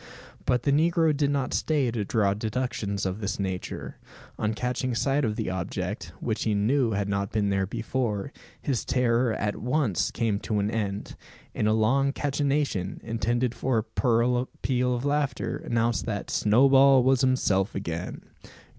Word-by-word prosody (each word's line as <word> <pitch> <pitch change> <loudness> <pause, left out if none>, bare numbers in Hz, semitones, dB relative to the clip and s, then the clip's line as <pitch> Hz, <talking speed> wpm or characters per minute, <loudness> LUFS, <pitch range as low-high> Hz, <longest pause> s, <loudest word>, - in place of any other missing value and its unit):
But 125 -1 +1
the 140 - +2
negro 160 +1 +3
did 140 0 +1
not 140 -2 -1
stay 145 -6 +1
to 110 -2 -2
draw 100 -1 +1
deductions 105 -2 -2
of 95 +2 -2
this 100 0 -3
nature. 95 -2 -4 0.4
On 110 0 0
catching 125 +1 -2
sight 140 +4 +1
of 110 -3 0
the 110 -5 -2
object, 95 +2 -4
which 110 -2 -2
he 110 -2 +1
knew 120 +5 +2
had 100 0 -1
not 100 0 -1
been 105 -2 +1
there 95 -1 0
before, 115 +1 -2 0.3
his 135 -5 -1
terror 125 -1 +2
at 105 -1 -2
once 125 - 0
came 110 -4 -1
to 105 - -2
an 100 +1 0
end; 105 -3 -3 0.4
and 105 - 0
a 110 - +3
long 135 +6 +2
cachinnation, 140 -9 -1
intended 115 +2 0
for 125 0 0 0.2
a 120 0 +2 0.2
peal 125 -1 +1
of 120 +3 -4
laughter, 145 -1 -1
announced 120 -6 -1
that 100 -3 -3
"Snowball 135 +4 +5
was 130 0 +3
himself 115 -7 +1
again." 85 -2 -4
115 Hz, 160 wpm, -26 LUFS, 105-135 Hz, 0.4 s, Snowball